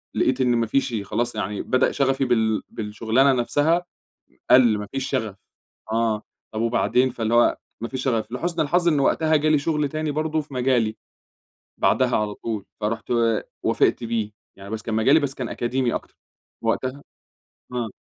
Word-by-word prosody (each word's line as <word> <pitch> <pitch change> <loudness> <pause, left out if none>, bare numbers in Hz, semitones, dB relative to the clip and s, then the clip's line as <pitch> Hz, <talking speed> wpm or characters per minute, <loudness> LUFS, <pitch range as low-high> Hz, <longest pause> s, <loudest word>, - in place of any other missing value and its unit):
لقيت 130 0 +1
إن 125 -1 +3
ما 115 -1 +1
فيش 135 -1 0
خلاص 120 +3 -2
يعني 105 -1 -3
بدأ 130 - +2
شغفي 135 -1 +1
بال 110 -3 +1
بالشُغلانة 115 +5 +1
نفسها 165 +8 +1 0.6
قَل، 120 -4 +6
ما 105 -1 -5
فيش 135 -1 -3
شغف. 110 -7 -2 0.6
آه. 110 -2 0 0.3
طب 110 - -2
وبعدين 125 +2 +2
فاللي 115 -2 -2
هو 120 0 +4 0.2
ما 115 - -2
فيش 130 -1 -4
شغف. 115 -3 -1
لحُسن 170 +7 -2
الحظ 175 +4 +2
إن 150 -4 +3
وقتها 155 +3 +2
جالي 155 +1 +3
شغل 150 -1 0
تاني 155 0 -2
برضه 155 +1 -1
في 145 -2 -14
مجالي 125 -4 +1 0.8
بعدها - - +2
على 105 -1 -1
طول، 110 -4 -4 0.2
فرُحت 115 +3 -3 0.5
وافقت - - +2
بيه. 115 -2 -2 0.3
يعني 100 0 -10
بس 110 0 -4
كان 110 0 -3
مجالي 135 +8 +5
بس 140 -2 -2
كان 125 -3 -4
أكاديمي 125 0 -1
أكتر. - - -7 0.5
وقتها 130 +5 -1 0.7
آه. 120 -2 -2
125 Hz, 165 wpm, -23 LUFS, 110-140 Hz, 0.8 s, قَل